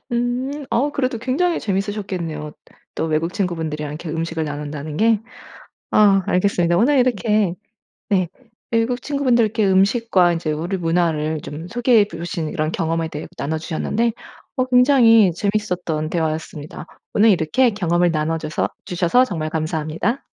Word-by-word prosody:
음. 250 +4 -2
어 275 +5 +1
그래도 255 -3 -1
굉장히 285 +9 0
재밌으셨겠네요. 190 -6 -3 0.4
또 - - -2
외국 160 +3 -1
친구분들이랑 160 -6 -3
이렇게 155 +1 -6
음식을 165 0 -2
나눈다는 150 0 -5
게. 220 0 +3 0.7
아 195 -3 +5
알겠습니다. 175 -2 +2
오늘 265 +7 +4
이렇게 215 -6 +2 0.6
네, 185 -3 +2 0.4
외국 230 +2 +1
친구분들께 240 -7 +1
음식과 190 -1 +3
인제 165 -2 -2
우리 170 +6 -2
문화를 165 -3 0
좀 160 +4 -7
소개해 240 -3 +3
주신 165 -1 -4
이런 155 +1 -2
경험에 165 0 -1
대해 150 0 -6
나눠 155 +3 -2
주셨는데 220 +8 -1 0.4
어 255 - +2
굉장히 250 -6 +5
재밌었던 180 -6 -2
대화였습니다. 160 -2 -4 0.3
오늘 215 +2 +5
이렇게 190 +9 +3
경험을 175 -3 +1
나눠줘서 155 0 -1 0.2
주셔서 180 +8 +2
정말 160 -8 -4
감사합니다. 160 - -2
180 Hz, 350 characters per minute, -20 LUFS, 160-230 Hz, 0.7 s, 아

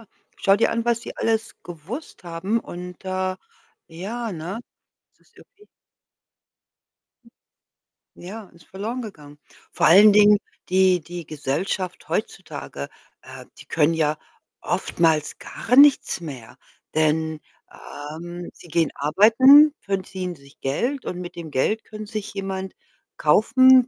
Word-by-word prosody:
ja. - - -15 0.3
Schau 195 0 +3
dir 215 - +2
an, 230 0 -1
was 235 -1 +2
die 235 - -8
alles 225 -1 -1
gewusst 180 - -9
haben 175 +6 -1
und, 180 0 -9
äh 185 0 -2 0.5
ja, 210 +7 -5
ne? 175 +6 -5 0.6
Das - - -31
ist - - -36
irgendwie 415 +1 -20 2.5
Ja, 210 +5 -9
ist 170 - -20
verloren 220 +7 -5
gegangen. 150 -10 -11 0.3
Vor - - +2
allen 200 +5 +8
Dingen, 210 0 +7 0.3
die 185 0 +4
die 175 +1 -8
Gesellschaft 170 +6 -3
heutzutage, 70 0 -5 0.3
äh, - - -11
die - - -12
können 160 +1 +2
ja 155 -1 +1 0.4
oftmals 160 -3 0
gar 245 - -2
nichts 280 -9 +5
mehr, 135 -9 -9 0.4
denn, 155 0 +1 0.3
ähm, 170 +4 -8
sie - - -16
gehen 165 -1 +1
arbeiten, 230 - +6
verdienen 185 -2 -4
sich 140 -2 -20
Geld 245 - -2
und 180 - -4
mit 175 0 -8
dem 170 -2 -7
Geld 180 +11 0
können 215 0 -9
sich 215 -1 -6
jemand 190 -1 -4 0.4
kaufen, 255 - +5
185 Hz, 130 wpm, -23 LUFS, 160-215 Hz, 2.5 s, allen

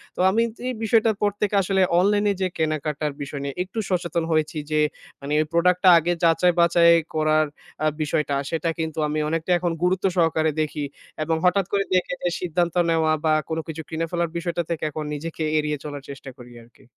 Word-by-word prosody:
তো - - -12
আমি 225 +4 +2 0.3
এই 255 - -1
বিষয়টার 220 0 +3
পর 205 -1 +2
থেকে 205 0 +1
আসলে 190 0 +1 0.2
অনলাইন 205 +2 +2
এ - - 0
যে, 185 - +2
কেনাকাটার 155 -1 -1
বিষয় 140 0 -5
নিয়ে 140 -1 -4
একটু 195 +4 -6
সচেতন 170 -2 -1
হয়েছি, 155 0 0
যে, 155 - +2 0.4
মানি 140 +2 -4
এই - - 0
প্রোডাক্ট 180 +1 +3
টা - - +9
আগে 175 +2 0
যাচাই-বাচাই 170 0 +4 0.2
করার 155 0 +3 0.4
আ - - +4
বিষয়টা, 150 -1 0
সেটা 165 +1 -1
কিন্তু 160 -1 -3
আমি 150 +1 -2
অনেকটা 165 +2 -2
এখন 175 -1 -1
গুরুত্ব 185 +2 +1
সহকারে 160 -2 +2
দেখি। 150 -1 -2 0.4
এবং 160 +1 0
হঠাৎ 180 +1 +3
করে 200 - +2
দেখে 180 0 +1
যে, 175 - +1
সিদ্ধান্ত 175 -1 -1
নেওয়া, 160 -1 +2
বা 155 - +4 0.2
কোনো 160 0 -1
কিছু 160 0 -5
কিনে 165 +1 -2
ফেলার 170 -1 0
বিষয়টা 170 0 -2
থেকে, 165 -2 -3
এখন 155 +1 -5
নিজেকে 160 +2 -5
এড়িয়ে 150 -1 0
চলার 145 -1 -6
চেষ্টা 135 -1 -8
করি 125 -1 -13
আরকি। 120 +3 -22
165 Hz, 195 wpm, -23 LUFS, 155-180 Hz, 0.4 s, টা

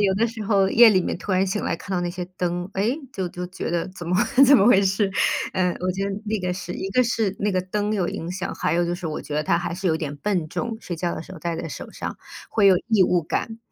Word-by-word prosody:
对， - - +3
有 195 -1 +3
的 225 +4 +2
时 225 -1 -6
候 195 -2 +3
夜 235 0 +8
里 190 -3 +3
面 - - -3
突 195 - -4
然 185 +1 +3
醒 195 +2 -2
来 - - -1
看 180 - -11
到 - - 0
那 175 - -1
些 180 0 -5
灯， 175 +1 -2
诶， 215 +7 +1 0.2
就 190 -5 -3
就 180 +1 -6
觉 185 -2 -5
得 170 -1 -1
怎 180 -2 -8
么 180 - +2 0.3
怎 285 - +9
么 200 - +4
回 215 -5 +6
事， 195 +1 +1 0.4
呃， 185 -1 +2
我 185 +1 0
觉 195 +2 -2
得 - - -2 0.2
那 215 +1 0
个 180 0 -1
是 180 -1 -6
一 195 - -4
个 255 +6 +4
是 220 -4 0
那 205 0 +1
个 185 - +2
灯 205 +3 -2
有 185 -4 0
影 165 - -4
响， 190 +1 -4
还 - - -1
有 175 0 +2
就 175 - -1
是 175 -1 -5
我 155 -1 -3
觉 150 - -6
得 150 - +1
它 170 - +2
还 175 0 -3
是 190 +2 -4
有 165 - +3
一 - - -2
点 145 -3 -4
笨 175 -1 -1
重， 230 +7 -3
睡 175 - -5
觉 170 +1 -2
的 - - -5
时 - - -16
候 - - -9
戴 170 -1 -3
在 165 - -5
手 - - -8
上， - - -5 0.3
会 210 -3 +3
有 190 -2 +7
异 220 -4 +5
物 175 -1 +2
感。 225 +8 -3
185 Hz, 320 characters per minute, -23 LUFS, 175-205 Hz, 0.4 s, 怎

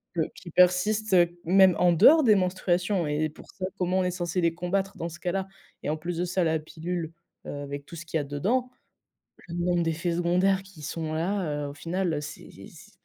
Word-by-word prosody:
que 165 - +1
qui 175 - -11
persistent 185 +4 +3 0.3
même 190 +1 +5
en 175 -1 +4
dehors 310 - +7
des 215 -4 +6
menstruations 180 0 0
et 150 +1 0
pour 150 - -15
ça 185 - -5
comment 185 0 +1
on - - +2
est 180 - 0
censé 175 0 -2
les 165 -1 +2
combattre 190 +3 -2
dans 170 +1 -3
ce 170 - -11
cas-là? 190 +1 -2 0.4
Et - - -2
en 155 - -1
plus 170 +2 -4
de 175 - 0
ça, 180 0 0
la 160 -1 +2
pilule, 160 +1 -5 0.3
heu, - - -5
avec 140 0 -6
tout 170 - -11
ce 170 - -8
qu'il 165 0 -2
y - - 0
a - - -4
dedans, 205 - -1 0.8
le 170 - -6
nombre 175 0 +1
d'effets 165 +1 -1
secondaires 180 +3 +2
qui 190 -6 -15
sont 155 +1 -4
là, 160 -4 -1
heu, - - -4
au - - -8
final, 175 +3 -2
heu, 145 - -2
c'est 150 +2 -9 0.2
c'est - - -16
175 Hz, 220 wpm, -27 LUFS, 160-185 Hz, 0.8 s, dehors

